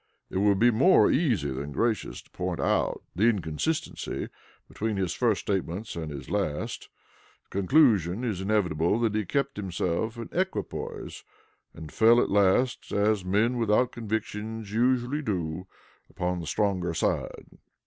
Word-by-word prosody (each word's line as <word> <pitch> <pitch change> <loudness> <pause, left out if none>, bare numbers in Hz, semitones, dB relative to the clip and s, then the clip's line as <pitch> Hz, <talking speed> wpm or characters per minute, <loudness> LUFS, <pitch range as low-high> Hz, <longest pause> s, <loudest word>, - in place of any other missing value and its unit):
It 95 - -1
would 100 0 +3
be 120 +4 +5
more 135 +12 +5
easy 110 - +1
than 70 +2 -5
gracious 115 - -1
to - - -27
point - - -3
out - - 0
the 100 +6 +2
inconsistency 105 - -2 0.4
between 110 -1 -3
his 95 -3 -1
first 115 -5 +1
statements 95 +1 -3
and 80 -2 -4
this 70 -2 -7
last. 95 -8 -3 0.5
The - - -42
conclusion 105 - +3
is 105 -7 -2
inevitable 95 -2 +1
that 115 -3 +1
he 105 -1 -1
kept 140 +5 -1
himself 95 +3 -2
in 115 - -6
equipoise, 190 +1 -4 0.5
and 80 -2 -9
fell 115 +1 +5
at - - +1
last, 100 +6 +2
as 105 -1 +2
men 105 +7 +1
without 115 +3 +2
convictions 110 -1 -4
usually 125 +4 +1
do, 90 - -3 0.4
upon 90 0 -2
the 85 - -6
stronger 90 -2 0
side. - - -3
105 Hz, 145 wpm, -27 LUFS, 90-115 Hz, 0.5 s, be